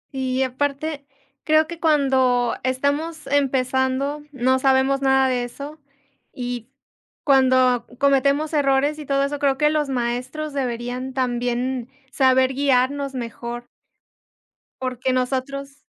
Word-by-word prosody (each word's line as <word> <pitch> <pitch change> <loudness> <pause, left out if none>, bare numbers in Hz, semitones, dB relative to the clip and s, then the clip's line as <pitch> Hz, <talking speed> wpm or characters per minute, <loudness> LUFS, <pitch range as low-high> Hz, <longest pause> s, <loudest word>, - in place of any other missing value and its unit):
Y 260 0 0
aparte, 280 +2 -3 0.4
creo 310 0 +4
que 340 +1 -8
cuando 265 -6 +2
estamos 285 +5 -1
empezando 270 +1 0
no 260 0 +1
sabemos 270 +1 +2
nada 265 -1 +3
de 250 -1 0
eso. 285 +5 -8 0.5
Y 245 -1 -5 0.5
cuando 255 -3 +3
cometemos 280 +3 +2
errores 285 +1 +2
y 295 - -8
todo 275 0 +2
eso, 285 +1 -2
creo 275 -2 +1
que 300 +2 +3
los 300 -2 0
maestros 255 +4 -3
deberían 250 0 -3
también 245 0 -1 0.2
saber 260 -1 +3
guiarnos 275 0 +1
mejor. 240 0 -6 1.2
Porque 255 0 -1
nosotros. 275 +2 -3
265 Hz, 115 wpm, -22 LUFS, 255-280 Hz, 1.2 s, creo